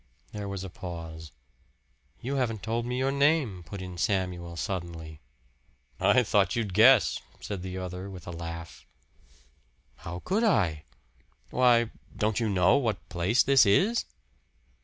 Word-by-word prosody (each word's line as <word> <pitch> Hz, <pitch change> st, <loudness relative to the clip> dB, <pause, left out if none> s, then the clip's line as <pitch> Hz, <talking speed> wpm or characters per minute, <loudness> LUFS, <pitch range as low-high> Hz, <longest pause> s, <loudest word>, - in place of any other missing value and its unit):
There 105 Hz, -1 st, -5 dB
was 100 Hz, -1 st, -4 dB
a 95 Hz, -, -6 dB
pause. 80 Hz, -3 st, -8 dB, 0.9 s
"You 135 Hz, +3 st, -2 dB
haven't 115 Hz, -6 st, -1 dB
told 115 Hz, +2 st, -2 dB
me 125 Hz, +1 st, -2 dB
your 135 Hz, +1 st, +1 dB
name," 140 Hz, -, +2 dB
put 95 Hz, +4 st, -8 dB
in 90 Hz, -1 st, -8 dB
Samuel 90 Hz, -4 st, -1 dB
suddenly. 85 Hz, -5 st, -5 dB, 0.8 s
"I 125 Hz, -, +4 dB
thought 100 Hz, -4 st, +2 dB
you'd 110 Hz, -5 st, -2 dB
guess," 115 Hz, +4 st, +6 dB, 0.2 s
said 100 Hz, -3 st, -5 dB
the 95 Hz, 0 st, -5 dB
other 90 Hz, +1 st, -5 dB
with 95 Hz, -2 st, -10 dB
a 90 Hz, -, -6 dB
laugh. 85 Hz, 0 st, -8 dB, 1.1 s
"How 85 Hz, +1 st, -7 dB
could 205 Hz, +5 st, +1 dB
I?" 85 Hz, -, +2 dB, 0.7 s
"Why 120 Hz, -2 st, +4 dB, 0.3 s
don't 110 Hz, 0 st, 0 dB
you 115 Hz, -2 st, 0 dB
know 95 Hz, -1 st, +4 dB
what 110 Hz, -9 st, -2 dB
place 95 Hz, +9 st, +2 dB
this 135 Hz, -1 st, +6 dB
is?" 190 Hz, -, +3 dB
100 Hz, 140 wpm, -28 LUFS, 85-120 Hz, 1.1 s, guess